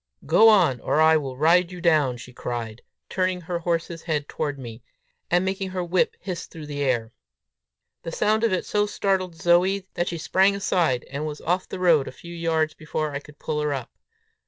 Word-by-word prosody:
"Go 220 +7 +6
on, 175 - +4
or 150 - 0
I 160 0 +6
will 135 -4 -2
ride 170 +4 +4
you 180 - -8
down," 155 -7 +2
she 125 +1 -11
cried, 120 -2 -5 0.3
turning 185 -1 -1
her 170 +1 -3
horse's 170 0 -2
head 150 -3 -2
toward 145 -2 -3
me, 120 -3 -9 0.5
and 175 +2 +2
making 190 0 -2
her 185 -1 -3
whip 175 +1 +1
hiss 185 -2 -5
through 160 -2 -10
the 145 -1 -5
air. 120 -5 0 0.9
The 165 - -6
sound 215 +5 +1
of 230 - +3
it 185 - -1
so 210 0 +1
startled 190 -4 -1
Zoe, 180 +4 +2
that 175 - -1
she 170 - -3
sprang 190 +5 +3
aside, 170 -10 +1
and 145 +3 -3
was 150 -1 -6
off 180 +2 -1
the - - -5
road 170 -6 +3
a - - -5
few 170 +6 -11
yards 160 -2 0
before 155 -1 -3
I 140 - -3
could 150 0 -16
pull 150 0 -3
her 150 -1 0
up. 130 -3 -7
165 Hz, 205 wpm, -24 LUFS, 145-185 Hz, 0.9 s, Go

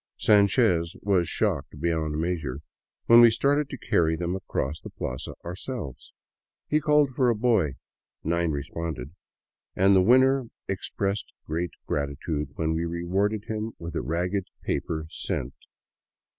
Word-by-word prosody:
Sanchez 90 -5 +3
was 95 -5 +2
shocked 70 +1 -1
beyond 80 -2 0
measure 80 -6 -2 0.4
when 115 0 +8
we 120 - +9
started 140 +5 +1
to 135 - -6
carry 80 -7 +2
them 85 +2 -2
across 75 -5 -3
the - - -8
plaza 65 0 -5
ourselves. 90 - -6 0.6
He 150 - +2
called 150 -2 +4
for 130 -1 +2
a 120 - +2
boy, 105 - +2 0.5
nine 85 +1 +1
responded, 75 -1 -4 0.6
and 95 +1 +5
the 95 - +6
winner 130 +4 +4 0.2
expressed 100 0 -2
great 85 +3 -2
gratitude 75 +1 -2
when 80 0 0
we 80 +1 -1
rewarded 95 +5 -1
him 110 +1 -3
with 85 +1 -7
a - - 0
ragged 90 +8 -1 0.2
paper 80 -1 -2
cent. 65 +2 -3
85 Hz, 135 wpm, -26 LUFS, 80-110 Hz, 0.6 s, we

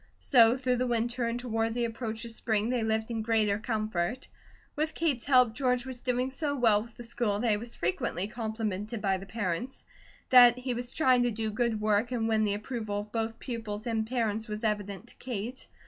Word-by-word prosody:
So 240 -2 +5
through 255 -1 0
the 250 +1 0
winter 240 +1 0
and 230 +1 -2
toward 225 -2 -1
the 240 -1 +1
approach 225 -1 -4
of 230 - -4
spring 220 0 0
they 250 -2 0
lived 220 +1 -1
in 225 -1 -2
greater 215 -2 +1
comfort. 220 +1 -2 0.5
With 310 +1 -1
Kate's 295 -8 0
help, 250 -5 +5
George 250 -1 +1
was 255 -2 -6
doing 250 +1 0
so 285 +1 -2
well 225 -5 +4
with 230 +1 -12
the 240 - -8
school 230 -3 -1
that 230 +1 +1
he - - +4
was 235 +2 -7
frequently 175 +1 -1
complimented 220 -1 -3
by 195 -2 +1
the 195 - -10
parents. 220 +4 -3 0.5
That 245 -1 +9
he 250 0 -2
was 245 0 -4
trying 255 -5 +3
to 245 - +2
do 220 -1 -2
good 225 0 0
work 215 +3 +1
and 230 -3 0
win 220 -1 +2
the 205 -1 +1
approval 210 -2 -3
of 210 0 -12
both 225 0 -2
pupils 225 -4 -5
and 225 -2 -1
parents 225 -2 -1
was 210 +1 -5
evident 205 -1 -2
to - - -11
Kate. 245 +1 -5
225 Hz, 210 wpm, -29 LUFS, 215-245 Hz, 0.5 s, That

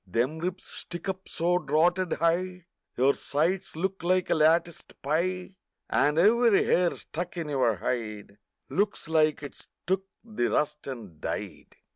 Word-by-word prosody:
Them 125 - 0
ribs 180 +2 -4
stick 175 +1 -6
up 190 0 -4
so 175 +2 +1
drotted 170 +4 +2
high 180 +2 0 0.3
Your 135 +3 +4
sides 175 +6 -1
look 190 +3 -2
like 180 +1 +1
a - - +6
latticed 165 +1 +1
pie, 180 +6 -1 0.4
And 150 +1 +3
every 225 +4 +5
hair 180 -1 +3
stuck 175 +2 -6
in 165 -3 -3
your 130 -6 +2
hide 105 -1 -4 0.3
Looks 205 +2 -1
like 155 -2 +2
it's 145 - -9 0.2
took 190 +1 0 0.2
the 215 - -1
rust 150 0 -1
and 110 - -8
died! - - -5
170 Hz, 145 wpm, -28 LUFS, 145-185 Hz, 0.4 s, a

